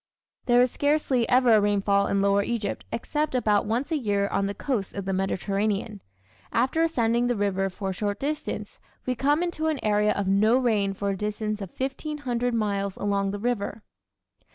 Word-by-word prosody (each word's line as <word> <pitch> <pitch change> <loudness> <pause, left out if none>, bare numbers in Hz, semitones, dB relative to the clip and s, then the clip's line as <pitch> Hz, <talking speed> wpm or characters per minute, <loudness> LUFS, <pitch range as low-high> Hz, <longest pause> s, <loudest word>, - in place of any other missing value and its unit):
There 240 -1 +5
is 250 -1 +3
scarcely 285 -5 +1
ever 250 -1 +5
a 215 - +6
rainfall 200 -1 +2
in 200 0 +1
lower 200 0 +3
Egypt 225 0 -3
except 295 +4 -2
about 210 -4 +2
once 240 +8 -1
a 320 - +2
year 200 -4 0
on 195 - 0
the 200 - -4
coast 225 -4 -3
of 200 -1 -4
the 195 - -1
Mediterranean. 200 +2 -1 0.5
After 260 +7 +1
ascending 240 -7 +2
the 245 - +1
river 195 -2 0
for 190 +1 -4
a - - -4
short 205 +2 -2
distance 300 +2 -4 0.3
we 255 - 0
come 290 +6 +1
into 330 -3 -2
an 310 -3 0
area 210 0 +3
of 200 -1 -2
no 215 +5 +4
rain 210 -6 +1
for 200 0 -1
a - - -2
distance 210 +1 -3
of 195 - -5
1500 265 -3 -2
miles 200 -3 -1
along 200 -1 0
the 205 - -3
river. 220 -1 -2
215 Hz, 185 wpm, -26 LUFS, 200-250 Hz, 0.5 s, a